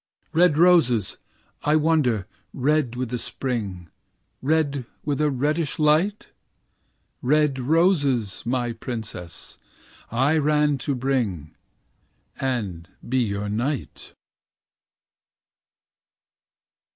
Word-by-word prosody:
"Red 165 Hz, -2 st, +4 dB
roses, 155 Hz, -, +4 dB, 0.4 s
I 150 Hz, -, +2 dB
wonder, 150 Hz, -10 st, +2 dB, 0.3 s
red 140 Hz, -2 st, +1 dB
with 125 Hz, -1 st, -3 dB
the 125 Hz, 0 st, -3 dB
Spring, 105 Hz, -10 st, -4 dB, 0.5 s
Red 145 Hz, -3 st, 0 dB, 0.2 s
with 145 Hz, 0 st, 0 dB
a 150 Hz, -, +3 dB
reddish 145 Hz, +4 st, -1 dB
light?" 160 Hz, +7 st, +2 dB, 0.9 s
"Red 150 Hz, 0 st, +2 dB
roses, 140 Hz, -, +2 dB
my 120 Hz, 0 st, -1 dB
princess, 110 Hz, -7 st, -7 dB, 0.5 s
I 140 Hz, +7 st, +2 dB
ran 150 Hz, -1 st, +2 dB
to 140 Hz, +2 st, -2 dB
bring. 120 Hz, -, -1 dB, 0.9 s
And 105 Hz, -11 st, -3 dB, 0.2 s
be 130 Hz, +2 st, +1 dB
your 105 Hz, -3 st, -1 dB
knight." 120 Hz, +6 st, -3 dB
130 Hz, 90 wpm, -24 LUFS, 115-150 Hz, 0.9 s, Red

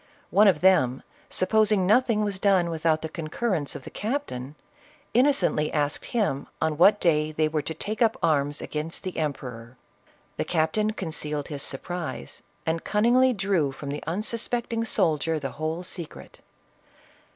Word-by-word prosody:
One 210 Hz, +2 st, +6 dB
of 180 Hz, -6 st, +3 dB
them, 135 Hz, -9 st, +3 dB, 0.3 s
supposing 210 Hz, 0 st, +2 dB
nothing 215 Hz, +1 st, +3 dB
was 200 Hz, -2 st, -2 dB
done 190 Hz, -4 st, +3 dB
without 160 Hz, -1 st, +1 dB
the -, -, -1 dB
concurrence 160 Hz, 0 st, -2 dB
of -, -, -7 dB
the -, -, -10 dB
captain, 205 Hz, -, -4 dB, 0.6 s
innocently 250 Hz, -, +3 dB
asked 145 Hz, -1 st, 0 dB
him 200 Hz, -, -1 dB
on 160 Hz, -1 st, -1 dB
what 205 Hz, +4 st, +6 dB
day 155 Hz, -3 st, +2 dB
they 155 Hz, 0 st, +1 dB
were 155 Hz, 0 st, -1 dB
to 160 Hz, -, -5 dB
take 215 Hz, +8 st, -5 dB
up 225 Hz, -1 st, +3 dB
arms 145 Hz, -2 st, +1 dB
against 155 Hz, +2 st, -4 dB
the 185 Hz, -, -3 dB
empe 150 Hz, -4 st, -2 dB
ror. 115 Hz, 0 st, -10 dB, 0.6 s
The -, -, 0 dB
captain 175 Hz, +6 st, +1 dB
concealed 150 Hz, -6 st, -3 dB
his 145 Hz, -2 st, -4 dB
surprise, 155 Hz, -, -5 dB, 0.2 s
and 165 Hz, 0 st, -1 dB
cunning 215 Hz, +3 st, +2 dB
ly 260 Hz, 0 st, +5 dB
drew 190 Hz, -, 0 dB
from 140 Hz, +1 st, -8 dB
the 145 Hz, +1 st, -4 dB
unsuspecting 230 Hz, +5 st, -1 dB
soldier 160 Hz, -5 st, +1 dB
the 135 Hz, -2 st, -4 dB
whole 160 Hz, +3 st, -3 dB
secret. 175 Hz, -3 st, -8 dB
165 Hz, 155 wpm, -26 LUFS, 150-210 Hz, 0.6 s, One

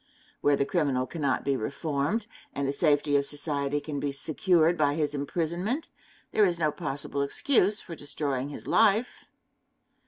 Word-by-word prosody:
Where 145 Hz, 0 st, +4 dB
the 140 Hz, -, 0 dB
criminal 140 Hz, -6 st, 0 dB
cannot 145 Hz, 0 st, -1 dB
be 140 Hz, -, +2 dB
reformed, 145 Hz, -, -2 dB, 0.3 s
and 140 Hz, -1 st, -1 dB
the 140 Hz, -, 0 dB
safety 145 Hz, -1 st, +2 dB
of 140 Hz, 0 st, 0 dB
society 145 Hz, -1 st, -1 dB
can 145 Hz, -1 st, -5 dB
be 140 Hz, 0 st, -1 dB
secured 165 Hz, +4 st, +2 dB
by 145 Hz, -3 st, +2 dB
his 150 Hz, -2 st, 0 dB
imprisonment, 175 Hz, -, -2 dB, 0.4 s
there 215 Hz, -, +4 dB
is 180 Hz, -4 st, +2 dB
no 155 Hz, -2 st, +1 dB
possible 145 Hz, -2 st, -3 dB
excuse 205 Hz, -, +2 dB
for 170 Hz, -, -9 dB
destroying 145 Hz, -3 st, -3 dB
his 145 Hz, -, -8 dB
life. 220 Hz, +2 st, +2 dB
145 Hz, 155 wpm, -28 LUFS, 140-170 Hz, 0.4 s, Where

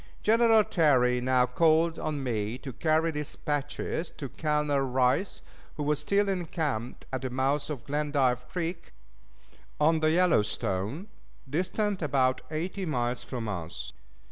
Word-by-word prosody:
General 225 Hz, 0 st, +5 dB
Terry 125 Hz, -9 st, +3 dB
now 130 Hz, 0 st, +3 dB
called 160 Hz, +4 st, +2 dB
on 150 Hz, -3 st, -3 dB
me 110 Hz, -2 st, -2 dB
to 130 Hz, -1 st, -8 dB
carry 160 Hz, +2 st, +1 dB
dispatches 150 Hz, +2 st, -3 dB
to 140 Hz, -, -7 dB
Colonel 150 Hz, +1 st, 0 dB
Rice, 130 Hz, +7 st, +1 dB, 0.3 s
who 150 Hz, -, -2 dB
was 150 Hz, 0 st, +1 dB
still 200 Hz, +7 st, +1 dB
encamped 155 Hz, -, -2 dB
at 130 Hz, -, -2 dB
the 130 Hz, -, -3 dB
mouth 135 Hz, +4 st, 0 dB
of 140 Hz, -6 st, -5 dB
Glendive 140 Hz, -4 st, 0 dB
Creek, 170 Hz, +1 st, -4 dB, 0.9 s
on 160 Hz, +2 st, +4 dB
the 155 Hz, 0 st, +3 dB
Yellowstone 145 Hz, -, +1 dB, 0.4 s
distant 185 Hz, +7 st, -1 dB
about 130 Hz, -4 st, +1 dB
eighty 175 Hz, +5 st, -3 dB
miles 125 Hz, -7 st, -1 dB
from 120 Hz, -4 st, -5 dB
us. 85 Hz, -5 st, -5 dB
150 Hz, 130 wpm, -28 LUFS, 125-165 Hz, 0.9 s, General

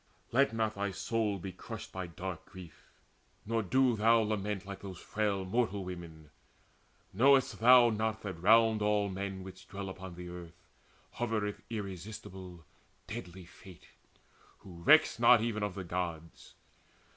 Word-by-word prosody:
Let 135 Hz, +2 st, +3 dB
not 110 Hz, -1 st, -1 dB
thy 100 Hz, 0 st, -2 dB
soul 105 Hz, +2 st, -1 dB
Be 95 Hz, +1 st, -6 dB
crushed -, -, -9 dB
by 95 Hz, -1 st, -5 dB
dark 90 Hz, +1 st, -6 dB
grief, 90 Hz, -4 st, -13 dB, 0.6 s
nor 115 Hz, +1 st, 0 dB
do 125 Hz, +4 st, +2 dB
thou 115 Hz, +2 st, +4 dB
lament 105 Hz, -2 st, -2 dB
Like 100 Hz, -1 st, -7 dB
those 95 Hz, -3 st, -8 dB
frail 100 Hz, -1 st, -2 dB
mortal 100 Hz, -1 st, 0 dB
women. 80 Hz, -4 st, -9 dB, 0.8 s
Know'st 135 Hz, +5 st, +4 dB
thou 120 Hz, 0 st, +7 dB
not 110 Hz, 0 st, -2 dB
That 95 Hz, -5 st, -6 dB
round 110 Hz, +2 st, +5 dB
all 105 Hz, -1 st, +2 dB
men 95 Hz, 0 st, -5 dB
which 95 Hz, 0 st, -11 dB
dwell 100 Hz, -1 st, -6 dB
upon 95 Hz, -1 st, -8 dB
the 90 Hz, 0 st, -8 dB
earth 85 Hz, -1 st, -11 dB, 0.5 s
Hovereth 110 Hz, -3 st, -2 dB
irresistible 95 Hz, -4 st, -7 dB, 0.4 s
deadly 95 Hz, -4 st, -8 dB
Fate, 90 Hz, 0 st, -15 dB, 0.7 s
Who 85 Hz, -3 st, -12 dB
recks 155 Hz, -, +5 dB
not 120 Hz, 0 st, +7 dB
even 110 Hz, -2 st, -2 dB
of 105 Hz, -3 st, -2 dB
the 95 Hz, -, -5 dB
Gods? 85 Hz, -2 st, -5 dB
100 Hz, 145 wpm, -32 LUFS, 90-110 Hz, 0.8 s, thou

